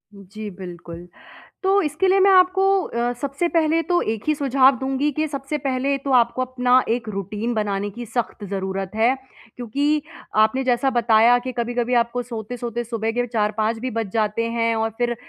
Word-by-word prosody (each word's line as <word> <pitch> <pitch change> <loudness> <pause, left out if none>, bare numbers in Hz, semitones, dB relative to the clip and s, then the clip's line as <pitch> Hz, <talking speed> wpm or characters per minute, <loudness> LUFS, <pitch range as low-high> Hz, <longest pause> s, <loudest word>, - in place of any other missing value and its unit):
जी 200 +2 -9
बिल्कुल। 175 -2 -9 0.6
तो 390 +1 +3
इसके 305 +5 0
लिए 385 +1 +4
मैं 395 +1 +6
आपको 370 0 +4 0.2
अ, 235 +1 -2
सबसे 280 +5 -1
पहले 330 -1 +2
तो 350 +2 +1
एक 220 -1 -3
ही 305 - +4
सुझाव 270 -2 +3
दूँगी 270 +3 0
कि 310 +3 -1
सबसे 275 +1 -4
पहले 270 0 -1
तो 275 +1 -5
आपको 245 0 +3
अपना 255 0 +2
एक 230 0 -1
रूटीन 210 +3 -3
बनाने 205 -2 -1
की 235 +4 -8
सख़्त 230 -2 -3
ज़रूरत 190 -1 -3
है। 230 +4 +3 0.4
क्योंकि 285 +6 0 0.3
आपने 240 +5 +3
जैसा 255 +2 +2
बताया 235 0 +4
कि 255 +1 -5
कभी-कभी 240 0 -1
आपको 235 +1 +1
सोते-सोते 240 0 -5
सुबह 225 -1 -2
के 245 +1 -1
4-5 220 -1 -1
भी 255 +3 -4
बज 225 -4 -3
जाते 220 0 0
हैं 230 0 0
और 225 0 0
फिर, 240 0 0
240 Hz, 175 wpm, -22 LUFS, 220-270 Hz, 0.6 s, मैं